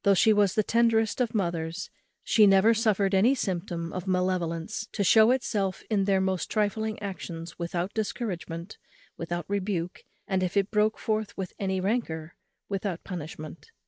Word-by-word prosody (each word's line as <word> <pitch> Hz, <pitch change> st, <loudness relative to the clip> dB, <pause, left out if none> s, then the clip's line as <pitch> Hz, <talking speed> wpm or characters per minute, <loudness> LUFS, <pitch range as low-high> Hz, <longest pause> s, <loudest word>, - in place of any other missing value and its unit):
Though 200 Hz, 0 st, +5 dB
she 215 Hz, +4 st, +5 dB
was 205 Hz, -3 st, +3 dB
the 215 Hz, -, +3 dB
tenderest 230 Hz, +1 st, +2 dB
of 235 Hz, -2 st, -1 dB
mothers, 170 Hz, -4 st, -2 dB, 0.3 s
she 215 Hz, -2 st, +5 dB
never 195 Hz, +3 st, +6 dB
suffered 210 Hz, -3 st, +1 dB
any 220 Hz, +8 st, +4 dB
symptom 170 Hz, -6 st, -3 dB
of 185 Hz, +1 st, -5 dB
malevolence 180 Hz, +2 st, -1 dB
to 205 Hz, -, 0 dB
shew 220 Hz, +4 st, +6 dB
itself 210 Hz, -7 st, 0 dB
in 200 Hz, -2 st, +2 dB
their 195 Hz, -1 st, +3 dB
most 190 Hz, -1 st, -1 dB
trifling 215 Hz, 0 st, 0 dB
actions 170 Hz, -4 st, -6 dB
without 175 Hz, +2 st, -2 dB
discouragement, 190 Hz, -5 st, -4 dB, 0.4 s
without 175 Hz, 0 st, -4 dB
rebuke, 195 Hz, -3 st, -2 dB, 0.3 s
and, 190 Hz, -1 st, 0 dB
if 185 Hz, +2 st, -1 dB
it 200 Hz, 0 st, +1 dB
broke 215 Hz, 0 st, +2 dB
forth 215 Hz, -1 st, -2 dB
with 190 Hz, -2 st, -4 dB
any 190 Hz, -1 st, -1 dB
rancour, 185 Hz, -6 st, -2 dB, 0.3 s
without 195 Hz, -3 st, -3 dB
punishment. 155 Hz, -3 st, -7 dB
195 Hz, 155 wpm, -27 LUFS, 175-215 Hz, 0.4 s, never